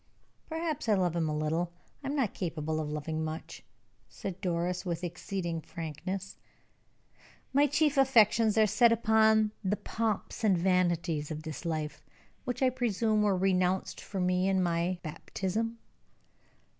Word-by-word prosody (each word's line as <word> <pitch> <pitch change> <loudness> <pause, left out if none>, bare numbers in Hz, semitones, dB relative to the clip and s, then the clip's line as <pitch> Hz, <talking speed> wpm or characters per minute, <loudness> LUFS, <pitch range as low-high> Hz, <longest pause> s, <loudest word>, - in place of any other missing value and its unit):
"Perhaps 320 -5 -2
I 210 - +5
love 180 -3 +1
him 165 -2 0
a 150 - -1
little. 160 +3 -1 0.3
I - - -4
am 280 - -1
not 260 -8 0
capable 160 -3 -2
of 155 -1 -3
loving 155 +1 -3
much," 155 +1 -6 0.5
said 190 -1 -6
Doris, 180 -1 -1
with 175 -2 -3
exceeding 175 -1 -3
frankness. 180 +5 -5 1.2
"My 285 +2 +5
chief 290 0 +2
affections 230 -4 +5
are 220 - +6
set 235 +3 +4
upon 220 -1 +4
the 200 +2 0
pomps 225 +1 -2
and 200 -4 +4
vanities 170 -4 +1
of 155 -1 -5
this 155 -1 -7
life, 155 -3 -3 0.4
which 250 +2 -2
I 255 - +4
presume 225 -3 +1
were 205 -3 +3
renounced 185 0 +1
for 195 - -5
me 180 +1 +2
in 190 -1 +2
my 175 +1 0
baptism." 190 +8 -3
185 Hz, 145 wpm, -30 LUFS, 165-220 Hz, 1.2 s, are